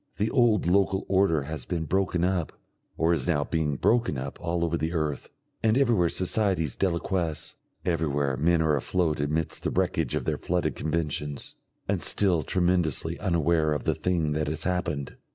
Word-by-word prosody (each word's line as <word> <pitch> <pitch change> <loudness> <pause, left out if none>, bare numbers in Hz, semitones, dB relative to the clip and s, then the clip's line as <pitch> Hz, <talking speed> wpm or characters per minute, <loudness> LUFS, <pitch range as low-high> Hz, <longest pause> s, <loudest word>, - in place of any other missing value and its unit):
The 105 +2 0
old 120 -5 +3
local 95 +2 +2
order 95 -6 +2
has 75 -1 -5
been 85 -2 -2
broken 90 0 0
up 90 -3 0 0.4
or 80 +1 +3
is 75 -6 -1
now 75 - +2
being 75 -2 -1
broken 115 - +1
up 65 +2 -6
all 85 0 0
over 85 0 -1
the 80 +1 -2
earth, 75 -4 -2 0.3
and 110 +2 +3
everywhere 115 -11 +3
societies 95 - 0
deliquesce, 85 -3 -1 0.3
everywhere 75 -6 0
men 80 +3 +2
are 75 -2 +2
afloat 80 +2 0
amidst 75 +2 -1
the - - -1
wreckage - - 0
of - - -2
their - - -1
flooded 90 0 -1
conventions, 75 -3 -3 0.3
and - - 0
still 90 -5 +3
tremendously 85 -1 +1
unaware 85 -4 +1
of 75 - -3
the - - +1
thing 85 -4 0
that 75 0 -1
has 80 +2 -2
happened. 85 -6 -2
85 Hz, 170 wpm, -27 LUFS, 75-90 Hz, 0.4 s, old